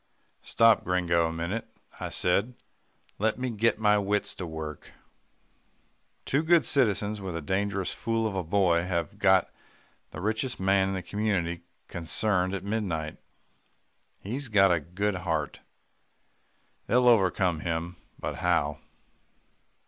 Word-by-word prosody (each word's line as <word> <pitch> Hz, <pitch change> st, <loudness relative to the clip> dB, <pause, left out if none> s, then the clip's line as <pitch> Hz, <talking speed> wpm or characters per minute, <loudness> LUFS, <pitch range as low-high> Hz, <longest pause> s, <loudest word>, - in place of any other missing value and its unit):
"Stop, 115 Hz, -1 st, +4 dB
Gringo, 85 Hz, -2 st, +1 dB
a -, -, -3 dB
minute," 85 Hz, +7 st, -3 dB, 0.3 s
I -, -, -4 dB
said. 100 Hz, +7 st, +1 dB, 0.6 s
"Let 110 Hz, +2 st, +1 dB
me 130 Hz, -1 st, -2 dB
get 115 Hz, +1 st, +1 dB
my 105 Hz, -1 st, +3 dB
wits 105 Hz, +1 st, -1 dB
to 90 Hz, -, -6 dB
work. 80 Hz, -1 st, -7 dB, 1.3 s
Two 140 Hz, -, +1 dB
good 165 Hz, +1 st, +4 dB
citizens 105 Hz, -5 st, +1 dB
with 95 Hz, -3 st, -5 dB
a 85 Hz, -, -3 dB
dangerous 100 Hz, +2 st, -1 dB
fool 115 Hz, 0 st, -1 dB
of 105 Hz, -3 st, -2 dB
a 95 Hz, -, -1 dB
boy 85 Hz, -1 st, +2 dB
have 85 Hz, -3 st, -3 dB
got -, -, +4 dB, 0.6 s
the -, -, -9 dB
richest 110 Hz, +6 st, -1 dB
man 95 Hz, 0 st, +3 dB
in 95 Hz, -, -2 dB
the 95 Hz, -, -4 dB
community 95 Hz, -5 st, -1 dB, 0.3 s
cornered 90 Hz, +3 st, 0 dB
at 95 Hz, -, -5 dB
midnight. 95 Hz, -8 st, -3 dB, 1.0 s
He's 125 Hz, +7 st, -4 dB
got 95 Hz, -4 st, +4 dB
a 85 Hz, -, +3 dB
good 95 Hz, +6 st, -2 dB
heart. 80 Hz, -5 st, -2 dB, 1.3 s
They'll 125 Hz, +2 st, +3 dB
overcome 95 Hz, -7 st, +3 dB
him, 85 Hz, +2 st, -3 dB, 0.2 s
but -, -, -5 dB
how? 85 Hz, -5 st, 0 dB
95 Hz, 135 wpm, -28 LUFS, 85-110 Hz, 1.3 s, Stop